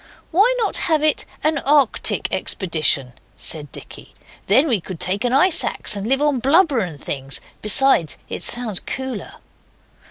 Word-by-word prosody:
'Why 405 Hz, +9 st, +4 dB
not 445 Hz, -4 st, -1 dB
have 310 Hz, -2 st, +2 dB
it 310 Hz, -1 st, +1 dB, 0.2 s
an 310 Hz, -1 st, +1 dB
Arctic 280 Hz, -3 st, +1 dB
expedition?' 155 Hz, -, 0 dB, 0.2 s
said 150 Hz, -4 st, -5 dB
Dicky; -, -, -10 dB, 0.3 s
'then 260 Hz, +10 st, +4 dB
we 230 Hz, -, 0 dB
could 180 Hz, -1 st, -9 dB
take 195 Hz, +4 st, -1 dB
an 245 Hz, -, 0 dB
ice 315 Hz, +7 st, +5 dB
axe, -, -, 0 dB
and 200 Hz, +1 st, -5 dB
live 270 Hz, +3 st, +1 dB
on 290 Hz, -4 st, +1 dB
blubber 285 Hz, +1 st, +3 dB
and 170 Hz, -8 st, -5 dB
things. 135 Hz, -1 st, -5 dB, 0.2 s
Besides, 210 Hz, -, +4 dB
it -, -, -6 dB
sounds 235 Hz, -6 st, -1 dB
cooler. 260 Hz, -4 st, -6 dB
245 Hz, 155 wpm, -20 LUFS, 185-295 Hz, 0.3 s, ice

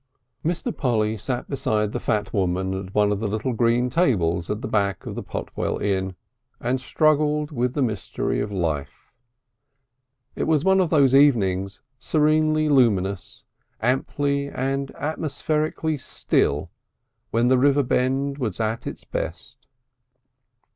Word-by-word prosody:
III 165 Hz, -, +2 dB
Mr. 210 Hz, +7 st, -4 dB
Polly 110 Hz, -5 st, +1 dB
sat 120 Hz, +3 st, -4 dB
beside 105 Hz, -6 st, 0 dB
the -, -, -3 dB
fat 105 Hz, -3 st, -1 dB
woman 95 Hz, 0 st, 0 dB
at 95 Hz, 0 st, -6 dB
one 105 Hz, -1 st, +3 dB
of 100 Hz, -, -1 dB
the 110 Hz, -, -1 dB
little 110 Hz, +5 st, -2 dB
green 120 Hz, +2 st, +2 dB
tables 90 Hz, -, +1 dB
at 105 Hz, +1 st, -3 dB
the -, -, -2 dB
back 100 Hz, -4 st, 0 dB
of -, -, -5 dB
the -, -, -5 dB
Potwell -, -, -3 dB
Inn, 95 Hz, -2 st, -1 dB, 0.4 s
and 125 Hz, +2 st, -1 dB
struggled 150 Hz, +1 st, +2 dB
with 125 Hz, -2 st, -1 dB
the 145 Hz, -, +2 dB
mystery 110 Hz, -5 st, -2 dB
of 105 Hz, -, -2 dB
life. 80 Hz, -7 st, -3 dB, 1.2 s
It -, -, -1 dB
was 155 Hz, 0 st, +2 dB
one 190 Hz, 0 st, +5 dB
of 180 Hz, -3 st, +2 dB
those 140 Hz, -5 st, +4 dB
evenings, 100 Hz, -8 st, +3 dB, 0.2 s
serenely 155 Hz, +1 st, +2 dB
luminous, 100 Hz, -9 st, +1 dB, 0.4 s
amply 140 Hz, +3 st, 0 dB
and 135 Hz, +1 st, -2 dB
atmospherically 155 Hz, 0 st, -2 dB
still, 75 Hz, -, 0 dB, 0.6 s
when 115 Hz, +2 st, +2 dB
the 130 Hz, -1 st, +4 dB
river 140 Hz, +1 st, +4 dB
bend 135 Hz, +3 st, 0 dB
was 110 Hz, -7 st, -3 dB
at 110 Hz, +1 st, -2 dB
its -, -, -6 dB
best. -, -, -6 dB
125 Hz, 140 wpm, -24 LUFS, 105-145 Hz, 1.2 s, one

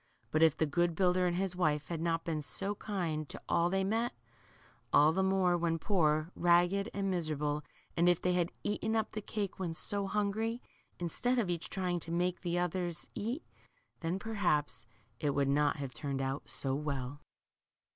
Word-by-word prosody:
But 155 Hz, -, +2 dB
if 160 Hz, -1 st, +5 dB
the 160 Hz, -, +3 dB
good 170 Hz, +3 st, +1 dB
builder 180 Hz, 0 st, +3 dB
and 175 Hz, -, 0 dB
his 185 Hz, 0 st, -1 dB
wife 150 Hz, -4 st, +1 dB
had 165 Hz, -2 st, -3 dB
not 165 Hz, -1 st, 0 dB
been 160 Hz, -2 st, -1 dB
so 195 Hz, +7 st, -3 dB
kind 170 Hz, -8 st, -3 dB
to -, -, -6 dB
all 170 Hz, 0 st, +3 dB
they 195 Hz, +1 st, +1 dB
met, 225 Hz, +5 st, 0 dB, 0.8 s
air 150 Hz, +2 st, +6 dB
the 190 Hz, +4 st, +1 dB
more 190 Hz, -2 st, +3 dB
when 170 Hz, -1 st, +1 dB
poor, 160 Hz, -3 st, +2 dB
ragged, 175 Hz, +3 st, +3 dB
and 195 Hz, -1 st, -1 dB
ipiserable, 150 Hz, -3 st, -1 dB, 0.3 s
and 175 Hz, +1 st, +4 dB
if 175 Hz, -, +3 dB
they 180 Hz, -, +1 dB
had 175 Hz, -1 st, +1 dB
eaten 220 Hz, +2 st, 0 dB
up 220 Hz, -1 st, 0 dB
the 215 Hz, -, -4 dB
cake 205 Hz, -2 st, -3 dB
when 170 Hz, -4 st, -2 dB
so 200 Hz, +3 st, -1 dB
hungry, 215 Hz, +3 st, 0 dB, 0.4 s
in 175 Hz, -, -2 dB
stead 245 Hz, +9 st, 0 dB
of 205 Hz, -7 st, +1 dB
each 170 Hz, -1 st, -3 dB
trying 180 Hz, -2 st, -1 dB
to 165 Hz, -, -7 dB
make 180 Hz, +1 st, 0 dB
the 175 Hz, -1 st, -1 dB
others 175 Hz, -1 st, -2 dB
eat, 245 Hz, +10 st, -3 dB, 0.6 s
then, 170 Hz, +2 st, -1 dB
perhaps, 170 Hz, -, 0 dB, 0.3 s
it 145 Hz, -2 st, 0 dB
would 140 Hz, -1 st, +2 dB
not 145 Hz, +1 st, +3 dB
have 140 Hz, -4 st, -5 dB
turned 140 Hz, -3 st, -3 dB
out 135 Hz, +1 st, -3 dB
so 135 Hz, -1 st, 0 dB
well. 140 Hz, -1 st, -3 dB
175 Hz, 185 wpm, -33 LUFS, 155-195 Hz, 0.8 s, air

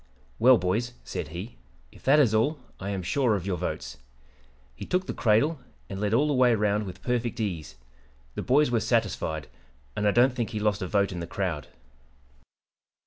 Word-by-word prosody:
"'Well, 125 Hz, +2 st, +7 dB
boys,' 110 Hz, +7 st, -1 dB
said -, -, -5 dB
he, 90 Hz, +9 st, -8 dB, 0.3 s
'if -, -, -17 dB
that 140 Hz, +3 st, +6 dB
is 125 Hz, -7 st, +4 dB
all, 140 Hz, +8 st, +2 dB, 0.2 s
I 95 Hz, -, -4 dB
am 95 Hz, -2 st, -3 dB
sure 120 Hz, +4 st, +2 dB
of 95 Hz, -3 st, -4 dB
your 95 Hz, -3 st, -1 dB
votes' 65 Hz, -5 st, -4 dB, 0.8 s
He -, -, -9 dB
took 185 Hz, +1 st, 0 dB
the -, -, -4 dB
'cradle' 130 Hz, +8 st, +2 dB, 0.3 s
and 95 Hz, -, -4 dB
led 105 Hz, -1 st, 0 dB
all 135 Hz, +7 st, +3 dB
the 150 Hz, -, +1 dB
way 125 Hz, -3 st, +4 dB
round 105 Hz, -1 st, 0 dB
with 90 Hz, -, -9 dB
perfect 120 Hz, -1 st, -1 dB
ease. 90 Hz, -, -3 dB, 0.6 s
The -, -, -4 dB
boys 140 Hz, +1 st, +3 dB
were 120 Hz, -, +3 dB
satisfied, 80 Hz, -7 st, -1 dB, 0.5 s
and 105 Hz, 0 st, 0 dB
I -, -, +5 dB
don't 125 Hz, +4 st, +4 dB
think 120 Hz, -3 st, -2 dB
he 110 Hz, -, -4 dB
lost 105 Hz, -1 st, 0 dB
a 95 Hz, -, -2 dB
vote 100 Hz, +1 st, +1 dB
in 90 Hz, -, -5 dB
the 85 Hz, -, -5 dB
crowd. 90 Hz, -6 st, -3 dB
105 Hz, 195 wpm, -27 LUFS, 95-125 Hz, 0.8 s, Well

